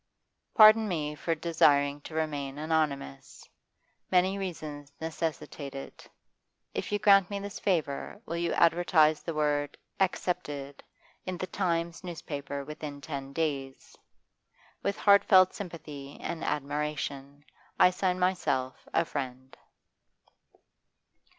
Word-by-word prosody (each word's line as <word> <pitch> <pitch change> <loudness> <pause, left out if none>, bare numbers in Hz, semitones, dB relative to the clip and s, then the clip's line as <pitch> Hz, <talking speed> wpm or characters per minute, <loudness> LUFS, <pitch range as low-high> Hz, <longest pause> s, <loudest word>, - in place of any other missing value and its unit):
Pardon 215 0 +8
me 155 -5 -2
for 165 +2 -2
desiring 145 -3 +3
to 155 - -10
remain 145 -3 -2
anonymous; 150 - -2 0.6
many 185 +1 +3
reasons 155 -7 -6
necessitate 160 -3 -4
it. 135 - -9 0.6
If - - -4
you 205 - +2
grant 195 -3 +5
me 200 - -3
this 200 0 -7
favour, 160 -8 -1
will 170 - -4
you 170 0 0
advertise 165 -2 +4
the 165 - -5
word 145 -1 0 0.2
"Accepted" 150 -7 -2 0.5
in 185 -1 -3
the 185 - -3
"Times" 170 -2 -2
newspaper 145 -5 -5
within 150 -1 -7
ten 140 -2 -6
days? 140 -3 -3 0.9
'With 200 +1 -1
heartfelt 195 -2 +6
sympathy 150 -7 -8
and 170 -1 -4
admiration, 145 -1 -3 0.3
'I 180 - +7
sign 180 0 0
myself, 145 -9 -1
'A 165 - +3
FRIEND. 130 -3 -6
155 Hz, 110 wpm, -29 LUFS, 145-180 Hz, 0.9 s, Pardon